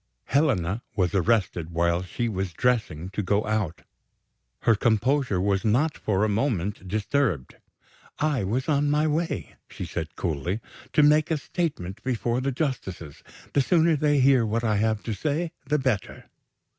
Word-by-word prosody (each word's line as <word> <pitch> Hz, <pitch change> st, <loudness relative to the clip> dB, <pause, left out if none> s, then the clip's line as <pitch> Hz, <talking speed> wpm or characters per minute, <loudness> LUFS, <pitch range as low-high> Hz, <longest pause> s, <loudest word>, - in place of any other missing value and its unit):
Helena 115 Hz, -, +1 dB
was 90 Hz, -4 st, +1 dB
arrested 95 Hz, -4 st, +1 dB
while 85 Hz, +1 st, +1 dB
she 105 Hz, +6 st, -3 dB
was 95 Hz, -4 st, -3 dB
dressing 105 Hz, -7 st, 0 dB
to 105 Hz, -, -2 dB
go 100 Hz, +2 st, +1 dB
out. 105 Hz, -6 st, -2 dB, 0.8 s
Her 115 Hz, -, +4 dB
composure 115 Hz, 0 st, +1 dB
was 95 Hz, 0 st, +1 dB
not 130 Hz, +8 st, +2 dB
for 100 Hz, -1 st, 0 dB
a -, -, +3 dB
moment 105 Hz, -4 st, -1 dB
disturbed. 105 Hz, -, -1 dB, 0.6 s
"I 150 Hz, -6 st, +1 dB
was 120 Hz, +8 st, -1 dB
on 145 Hz, -1 st, +2 dB
my 150 Hz, +1 st, +2 dB
way," 155 Hz, -, -2 dB
she -, -, -6 dB
said 80 Hz, -2 st, -5 dB
coolly, 85 Hz, -, -2 dB, 0.3 s
"to 150 Hz, -, +5 dB
make 150 Hz, +1 st, +4 dB
a 160 Hz, -, +1 dB
statement 140 Hz, -, -3 dB
before 120 Hz, -1 st, -1 dB
the 135 Hz, +1 st, 0 dB
justices. 110 Hz, -, -4 dB, 0.3 s
The 140 Hz, -, +4 dB
sooner 165 Hz, +2 st, +3 dB
they 145 Hz, -1 st, +2 dB
hear 130 Hz, -2 st, +5 dB
what 115 Hz, +2 st, -1 dB
I 110 Hz, -2 st, +2 dB
have 110 Hz, 0 st, 0 dB
to 115 Hz, -, -3 dB
say 155 Hz, +8 st, -1 dB, 0.2 s
the 150 Hz, +2 st, +2 dB
better." 130 Hz, -7 st, -2 dB
110 Hz, 155 wpm, -26 LUFS, 95-140 Hz, 0.8 s, to